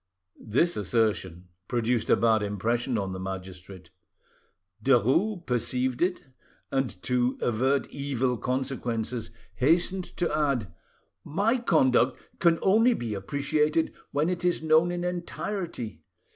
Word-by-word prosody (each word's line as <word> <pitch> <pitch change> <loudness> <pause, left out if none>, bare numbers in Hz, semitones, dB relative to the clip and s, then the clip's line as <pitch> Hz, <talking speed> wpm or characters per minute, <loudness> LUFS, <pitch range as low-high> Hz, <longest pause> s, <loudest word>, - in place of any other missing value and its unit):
This 150 +11 +1
assertion 95 -4 -1 0.2
produced 120 -1 0
a - - +6
bad 110 -2 +3
impression 115 +5 -1
on 95 -2 -2
the 95 - -5
magistrate. 95 0 -8 0.9
Derues 140 - +2
perceived 125 +1 -1
it, 180 +1 0 0.5
and 135 -8 -1
to 125 0 +1
avert 130 +4 +1
evil 135 -3 -1
consequences, 125 -3 -2 0.3
hastened 175 +6 +2
to 170 -4 0
add— 135 - 0 0.5
"My 205 - +1
conduct 130 - +3 0.2
can 170 -2 +4
only 225 +5 +5
be 115 -3 -4
appreciated 150 +9 0 0.2
when 145 +2 0
it 180 -1 -2
is 175 -2 +1
known 160 +2 +4
in 175 0 -3
entirety. 175 - -4
130 Hz, 115 wpm, -27 LUFS, 110-165 Hz, 0.9 s, a